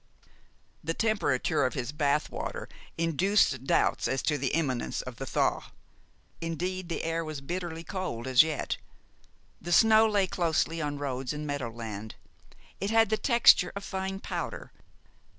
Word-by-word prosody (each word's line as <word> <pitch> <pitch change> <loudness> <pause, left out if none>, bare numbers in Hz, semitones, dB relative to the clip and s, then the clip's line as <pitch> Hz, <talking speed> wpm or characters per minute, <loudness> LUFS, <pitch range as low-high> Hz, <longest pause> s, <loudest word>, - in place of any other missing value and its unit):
The 165 +2 -2
temperature 205 - +1
of 130 - 0
his 125 -2 -3
bath 150 -1 0
water - - -5 0.3
induced 165 - +2
doubts - - +2
as 135 - -1
to 150 -2 +1
the 135 - -1
imminence 130 -5 -1
of 125 -2 -8
the 135 - -6
thaw. - - +1 0.8
Indeed, 175 +2 -3
the 165 - -3
air 165 0 -1
was 155 -2 -5
bitterly 165 +2 -5
cold 170 -12 -4
as 130 -1 +6
yet. 155 -2 -1 0.8
The 175 - -5
snow 220 +4 +6
lay 205 -2 +3
closely 165 -2 0
on 145 -1 -2
roads 135 -2 -3
and 150 0 -5
meadow 145 -5 -3
land. 110 -2 -7 0.6
It 200 - -2
had 225 -1 +4
the - - +4
texture 235 -8 +5
of 200 - -5
fine 190 0 -4
powder. - - -5
160 Hz, 150 wpm, -29 LUFS, 135-185 Hz, 0.8 s, as